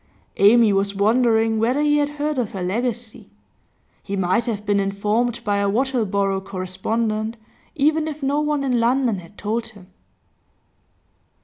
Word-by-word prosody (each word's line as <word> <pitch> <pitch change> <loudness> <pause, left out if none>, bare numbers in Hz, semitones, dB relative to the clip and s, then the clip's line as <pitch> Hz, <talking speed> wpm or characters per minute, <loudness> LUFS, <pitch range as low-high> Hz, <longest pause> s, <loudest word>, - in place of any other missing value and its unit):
Amy 215 +1 +5
was 200 +1 0
wondering 225 +1 +2
whether 245 +5 +1
he 295 0 +3
had 290 0 +1
heard 295 -1 -2
of 230 -4 -3
her 190 -2 -4
legacy. 230 +4 -3 0.7
He 200 - -5
might 190 +4 +1
have 210 -3 -3
been 205 -1 +2
informed 210 +4 -1
by 205 -1 0
a 200 0 +1
Wattleborough 200 -5 0
correspondent, 215 +4 -3 0.4
even 310 +1 +2
if 305 -2 -6
no 280 +2 +1
one 300 -1 0
in 250 -3 +1
London 240 -3 +1
had 180 +3 -15
told 225 +2 -2
him. 195 -4 -16
225 Hz, 145 wpm, -21 LUFS, 200-255 Hz, 0.7 s, Amy